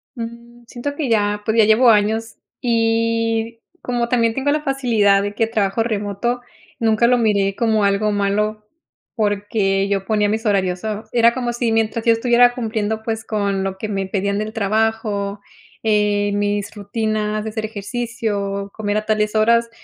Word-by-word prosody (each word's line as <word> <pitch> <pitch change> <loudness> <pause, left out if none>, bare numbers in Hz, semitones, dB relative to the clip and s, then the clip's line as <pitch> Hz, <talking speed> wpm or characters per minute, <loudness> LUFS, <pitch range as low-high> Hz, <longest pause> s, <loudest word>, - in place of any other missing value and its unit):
Mm, 235 +1 -9
siento 270 +5 -5
que 285 -5 -2
ya, 210 -2 +1
pues, 220 +1 0
ya 220 - +6
llevo 225 +3 +5
años 220 +1 +2 0.2
y 230 -1 0 0.2
como 240 -1 -1
también 230 -2 +2
tengo 270 +3 0
la 300 +1 0
facilidad 230 -8 +2
de 205 0 -3
que 225 +1 0
trabajo 215 -1 0
remoto, 220 +2 -2 0.4
nunca 225 0 +3
lo 250 +1 +4
miré 200 -4 +1
como 220 -3 +1
algo 200 +2 +1
malo, 210 +1 -1 0.5
porque, 205 -2 0
yo 195 -1 -1
ponía 210 -1 +1
mis 220 +2 -2
horarios, 190 -3 +1
so 215 0 -4
era 235 -1 +4
como 245 -2 -2
si 235 -1 -1
mientras 225 0 0
yo 230 - +6
estuviera 245 +1 +4
cumpliendo, 220 -2 -2
pues, 225 0 -3
con 200 -3 -1
lo 190 0 -3
que 215 - -4
me 195 -2 -2
pedían 200 +1 -1
del 215 +1 -4
trabajo, 215 -1 -1 0.4
eh, 210 -1 +2
mis 205 0 -1
rutinas 215 0 -2
de 220 - -4
hacer 220 0 -4
ejercicio, 205 -2 -3
comer 205 -1 -2
a 215 - -2
tales 215 0 0
horas, 230 +2 +3
220 Hz, 165 wpm, -20 LUFS, 205-230 Hz, 0.5 s, ya